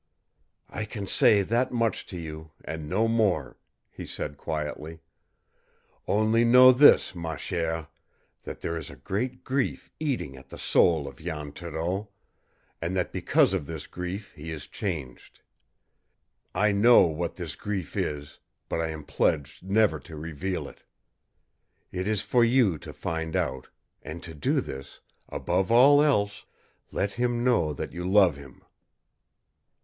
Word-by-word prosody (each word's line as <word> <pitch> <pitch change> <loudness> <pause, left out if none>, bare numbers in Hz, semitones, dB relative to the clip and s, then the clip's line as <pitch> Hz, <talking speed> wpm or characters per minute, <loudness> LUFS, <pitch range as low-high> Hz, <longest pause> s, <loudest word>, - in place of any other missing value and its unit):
"I 105 - -3
can 105 -1 -6
say 100 +1 +4
that 120 +6 +1
much 115 -2 0
to 90 - -7
you, 80 -1 -7 0.2
and 80 -1 -5
no 115 +7 +2
more," 105 - +1 0.3
he - - -8
said 75 - -5
quietly. 75 +1 -5 1.1
"Only 110 +2 +3
know 125 +2 +8
this, 130 -6 +6
ma 80 -3 -4
chère 80 -3 -3 0.5
that - - -8
there 85 - -2
is 80 -2 -5
a 70 - -10
great 120 - -3
grief 135 0 -2
eating 130 - -2
at 65 0 -14
the - - -9
soul 80 -5 +3
of 70 - -9
Jan 75 -3 -5
Thoreau, 85 +6 -4 0.7
and 85 +3 -2
that 90 -2 -1
because - - +3
of 70 - -2
this 80 -2 -6
grief 90 +3 -6
he 80 +1 -9
is 75 -3 -6
changed. 80 -11 -6 1.1
I 105 +3 +3
know 110 +5 +7
what 85 +1 0
this 85 -4 -5
grief 100 -6 -4
is, 75 0 -3 0.3
but 80 - -1
I 80 - 0
am 80 -1 -6
pledged 75 -1 0
never 95 -3 +2
to 80 +3 -11
reveal 85 +4 -4
it. - - -14 1.1
It 95 +1 -3
is 110 -2 0
for 120 -1 +3
you 115 - +3
to - - -9
find 80 -1 -4
out, 65 -1 -1 0.3
and 80 +2 -8
to 85 - -8
do 75 - +1
this, 70 +1 -9 0.3
above 95 +5 -1
all 140 +5 +7
else 105 -9 +1 0.5
let 100 0 -1
him 120 0 0
know 120 -11 +2
that - - -5
you 90 - -5
love 95 -3 +5
him!" 70 -1 -14
90 Hz, 150 wpm, -27 LUFS, 80-110 Hz, 1.1 s, know